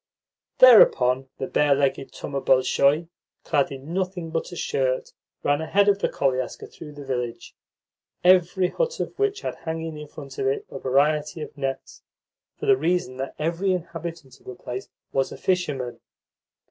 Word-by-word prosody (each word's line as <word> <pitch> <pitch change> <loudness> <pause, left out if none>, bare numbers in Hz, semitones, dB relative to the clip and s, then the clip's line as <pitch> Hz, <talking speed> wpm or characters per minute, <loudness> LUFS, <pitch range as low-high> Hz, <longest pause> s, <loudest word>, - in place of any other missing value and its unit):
Thereupon 135 - +6
the 135 - -3
barelegged 140 -1 +1
Thoma 140 -1 -4
Bolshoy, 140 +4 +3 0.4
clad 140 -2 +1
in 140 +4 -8
nothing 180 -3 -3
but 165 +2 -3
a - - -7
shirt, 130 -5 -1 0.3
ran 145 +1 +2
ahead 200 +5 +2
of 200 -1 +4
the - - 0
koliaska 130 -2 -1
through 150 -2 -11
the 145 -1 -10
village, 125 -3 -4 0.7
every 180 0 +4
hut - - -2
of - - -3
which 415 -1 0
had - - -3
hanging 160 -1 -5
in 150 - -8
front 140 -2 -10
of 135 - 0
it 135 - -1
a 135 - -6
variety 150 +4 +1
of - - -10
nets, 135 -2 -5 0.6
for - - -5
the 405 -2 +5
reason 175 - 0
that 135 +1 -5
every 170 +5 0
inhabitant 165 -5 -6
of - - -24
the 125 - -7
place 125 +1 -7 0.2
was 135 -1 0
a - - -8
fisherman. 145 -10 -1
150 Hz, 160 wpm, -24 LUFS, 135-180 Hz, 0.7 s, Thereupon